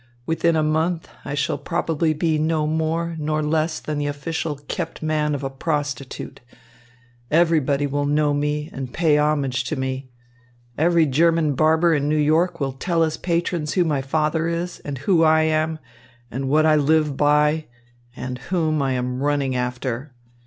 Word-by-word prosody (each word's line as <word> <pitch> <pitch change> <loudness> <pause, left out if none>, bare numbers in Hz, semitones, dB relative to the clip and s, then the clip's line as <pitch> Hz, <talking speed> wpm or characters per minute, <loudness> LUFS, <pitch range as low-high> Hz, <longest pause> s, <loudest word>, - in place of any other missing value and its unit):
Within 165 +1 +1
a 155 - +2
month, 160 +2 0
I 140 - -4
shall 145 -1 -1
probably 165 0 0
be 155 0 0
no 155 0 +1
more 160 +2 -1
nor 155 0 -1
less 155 +1 0
than 150 -1 -4
the 145 - -1
official 150 +2 -3
kept 165 -2 -4
man 150 -1 0
of 140 - -5
a 135 - -1
prostitute. 145 -1 -4 0.9
Everybody 155 -4 +2
will 145 0 -1
know 150 0 +2
me 150 +1 -1
and 130 -2 -5
pay 155 -1 +2
homage 140 -4 +1
to 155 - -2
me. 130 -1 -4 0.7
Every 170 +1 +3
German 160 +2 +2
barber 160 +4 +3
in 145 -1 0
New 155 - +2
York 155 +4 +2
will 135 -2 -1
tell 165 +5 0
his 160 -1 0
patrons 170 -3 -1
who 180 - +3
my 150 -5 0
father 155 +4 0
is, 170 +1 -3
and 145 -2 -6
who 165 +5 +2
I 160 0 +5
am, 155 0 +1 0.5
and 135 +2 -3
what 155 +2 +4
I 155 -1 +5
live 150 0 +2
by, 150 +2 +3 0.5
and 125 -1 -5
whom 160 -4 +1
I 135 -1 0
am 125 0 -2
running 140 -2 0
after. 125 +2 -3
155 Hz, 165 wpm, -22 LUFS, 145-160 Hz, 0.9 s, I